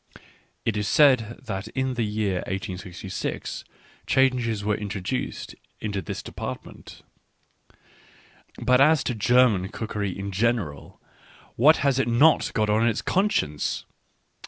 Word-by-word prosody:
(It 110 - 0
is 105 -1 -1
said 125 -6 +4
that 95 -1 -5
in 130 +3 -2
the 120 - -2
year 105 -3 -1
1866 95 -1 -5 0.4
changes 125 -5 +2
were 105 - +2
introduced 100 +3 -4 0.3
into 100 -2 -3
this 80 - -6
depart - - -6
ment.) - - -13 1.6
But 125 +1 +3
as 150 0 +5
to 125 - -1
German 110 -3 +3
cookery 105 -4 -4
in 100 0 -5
general 100 - -2 0.3
— - - -25
what 150 +7 +6
has 135 -2 +3
it 135 - +1
not 140 +7 +4
got 110 -2 +2
on 110 +2 +2
its 115 - -1
conscience! 185 - 0
110 Hz, 130 wpm, -25 LUFS, 100-125 Hz, 1.6 s, what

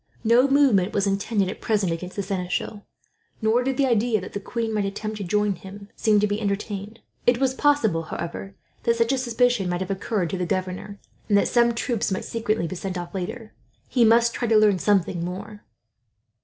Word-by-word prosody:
No 240 +4 +5
movement 265 -9 +3
was 200 -1 +1
intended 200 0 0
at 190 - -6
present 205 -5 +1
against 180 +2 -5
the 200 - -2
seneschal, 190 +2 -3 0.5
nor 220 +2 +2
did 265 0 -1
the 275 - +3
idea 235 -2 +2
that 185 - -9
the 200 - -3
queen 225 +2 -3
might 210 -1 0
attempt 215 +2 -4
to 205 - -4
join 210 +2 +1
him 200 +2 -11
seem 215 -2 +3
to 210 - +3
be 205 +1 -2
entertained. 205 +1 -4 0.3
It 245 0 +5
was 265 -1 +2
possible, 265 - +2
however, 170 +4 -6 0.3
that 235 - +2
such 230 +2 +2
a - - +1
suspicion 240 -5 +1
might 175 +1 -2
have 190 +1 -3
occurred 195 -3 -2
to 190 - -3
the 180 - 0
governor, 190 +2 -3 0.3
and 205 - +5
that - - +3
some 235 -1 +3
troops 230 -3 -1
might 190 - -2
secretly 220 -4 -1
be 185 - -5
sent 185 0 -4
off, 175 -1 -6
later. 215 +4 -5 0.4
He 245 - +3
must 230 +1 +5
try 240 - -2
to 225 -1 +4
learn 210 -3 +4
something 185 -4 +1
more. 200 +4 -7
210 Hz, 205 wpm, -24 LUFS, 190-230 Hz, 0.5 s, No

